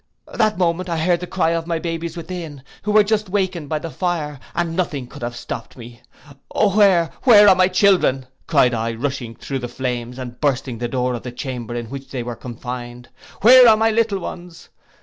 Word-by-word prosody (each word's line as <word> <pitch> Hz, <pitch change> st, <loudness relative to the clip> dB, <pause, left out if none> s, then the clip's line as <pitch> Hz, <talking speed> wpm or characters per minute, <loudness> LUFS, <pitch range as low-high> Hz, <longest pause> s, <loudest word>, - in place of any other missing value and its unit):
'—That 215 Hz, -3 st, +1 dB
moment 180 Hz, 0 st, 0 dB
I 165 Hz, -, -1 dB
heard 170 Hz, +2 st, +1 dB
the 180 Hz, -, -6 dB
cry 170 Hz, -3 st, 0 dB
of 165 Hz, 0 st, -2 dB
the 165 Hz, -1 st, -1 dB
babes 165 Hz, 0 st, -4 dB
within, 165 Hz, -5 st, -7 dB, 0.2 s
who 210 Hz, -, -2 dB
were 210 Hz, 0 st, +6 dB
just 215 Hz, 0 st, 0 dB
awaked 185 Hz, -6 st, -2 dB
by 155 Hz, -, 0 dB
the 165 Hz, +1 st, -6 dB
fire, 155 Hz, -6 st, -3 dB, 0.2 s
and 170 Hz, -1 st, -1 dB
nothing 155 Hz, -7 st, -2 dB
could 125 Hz, -, -13 dB
have 120 Hz, 0 st, -4 dB
stopped 120 Hz, -, -7 dB
me. 120 Hz, 0 st, -12 dB, 0.5 s
'Where, 195 Hz, -6 st, +4 dB
where, 210 Hz, -5 st, +7 dB
are 195 Hz, -, +8 dB
my 185 Hz, 0 st, +3 dB
children?' 185 Hz, -8 st, +3 dB, 0.2 s
cried 135 Hz, -6 st, +3 dB
I, 115 Hz, 0 st, -2 dB
rushing 125 Hz, -2 st, -4 dB
through 135 Hz, -1 st, -5 dB
the 120 Hz, -, -5 dB
flames, 125 Hz, 0 st, -4 dB
and 125 Hz, -2 st, -8 dB
bursting 130 Hz, -4 st, -1 dB
the 120 Hz, -, -2 dB
door 125 Hz, 0 st, -1 dB
of 120 Hz, -, -4 dB
the 125 Hz, -, -7 dB
chamber 120 Hz, -2 st, -6 dB
in 120 Hz, -1 st, -5 dB
which 135 Hz, -1 st, -8 dB
they 130 Hz, -3 st, -4 dB
were 120 Hz, 0 st, -5 dB
confined, 120 Hz, 0 st, -8 dB, 0.3 s
'Where 250 Hz, +1 st, +9 dB
are 215 Hz, -, +6 dB
my 225 Hz, +1 st, +2 dB
little 220 Hz, -2 st, +1 dB
ones? 175 Hz, -2 st, -9 dB
160 Hz, 205 wpm, -20 LUFS, 125-185 Hz, 0.5 s, Where